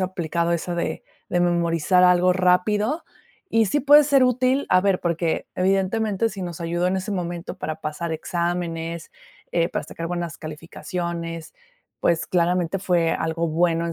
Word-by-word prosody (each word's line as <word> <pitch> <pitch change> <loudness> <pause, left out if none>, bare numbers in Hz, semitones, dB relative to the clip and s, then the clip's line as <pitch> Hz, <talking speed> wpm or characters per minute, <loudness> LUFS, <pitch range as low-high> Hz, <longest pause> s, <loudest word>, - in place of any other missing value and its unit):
aplicado 170 -2 -1
esa 170 +1 -2
de 170 - -3 0.3
de 175 - +1
memorizar 175 +1 +2
algo 180 0 +5
rápido, 205 - +1 0.5
y 225 -1 +3
sí 290 +10 +1
puede 290 +2 +7
ser 280 -2 +4
útil, 255 +2 +2
a 185 - +5
ver, 195 -2 +2
porque, 170 -1 -1
evidentemente, 195 +3 +1
si 195 - -8
nos 175 -2 -6
ayudó 170 +1 -1
en 190 - 0
ese 190 +3 -4
momento 175 -2 -4
para 155 +1 -5
pasar 160 +2 -4
exámenes, 170 0 -3 0.4
eh, 170 0 +2
para - - -3
sacar 165 - -6
buenas 175 -3 -4
calificaciones, 165 +1 -6 0.5
pues, 170 -1 +1
claramente, 175 +1 +1
fue 175 -3 +2
algo 165 +1 -1
bueno 165 +1 +1
en 170 - -3
175 Hz, 155 wpm, -23 LUFS, 170-190 Hz, 0.5 s, puede